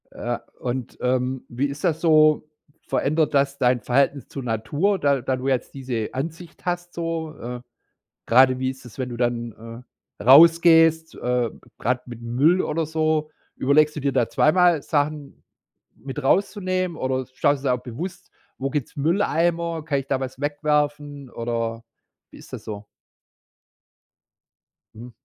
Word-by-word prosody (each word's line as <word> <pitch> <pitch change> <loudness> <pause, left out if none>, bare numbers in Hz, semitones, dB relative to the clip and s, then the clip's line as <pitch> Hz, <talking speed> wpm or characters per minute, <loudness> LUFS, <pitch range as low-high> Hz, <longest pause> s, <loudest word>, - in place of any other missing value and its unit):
Ja, - - -4 0.2
und, 125 -1 -4
ähm, 125 +1 -1
wie 130 +4 -1
ist 140 +1 -8
das 160 -3 0
so? 155 -2 +4 0.4
Verändert 155 +2 +1
das 140 0 +2
dein 125 -1 +2
Verhältnis 135 +3 +1
zur 135 - -7
Natur, 145 - 0
da 140 -2 +2
da 130 +2 -1
du 130 +1 -4
jetzt 130 -2 -1
diese 125 -5 -3
Ansicht 165 +5 -6
hast 175 0 -3
so? 165 -2 -3
Äh, 125 0 -6 0.7
gerade 130 +2 +5
wie 130 0 -1
ist 130 0 -11
das, 120 0 -13
wenn 130 -1 -3
du 120 - -5
dann, 115 -1 -4 0.4
äh, - - -5
rausgehst, 165 +3 +6
äh, 125 -2 -1 0.3
gerade 125 +1 0
mit 120 -2 -9
Müll 140 +10 +2
oder 160 +2 -1
so? 155 -1 0 0.2
Überlegst 150 +3 +3
du 150 - -4
dir 140 0 +1
da 125 -4 +1
zweimal 170 -1 +3
Sachen 145 -1 -2 0.5
mit 135 +2 -7
rauszunehmen 185 +1 0
oder 130 -2 -1
schaust 145 0 +1
du 140 - 0
jetzt 125 - +3
auch - - -18
bewusst, 175 +10 -7 0.3
wo 135 - -2
gibt's 145 -4 -4
Mülleimer, 170 0 0
kann 140 -3 0
ich 135 - -10
da 135 - +1
was 130 0 -6
wegwerfen 145 -1 -1
oder 115 -1 -3 0.5
wie - - -14
ist - - -15
das - - -7
so? 105 -1 -7 2.1
Mhm. 120 +3 -10
140 Hz, 155 wpm, -23 LUFS, 125-160 Hz, 2.1 s, rausgehst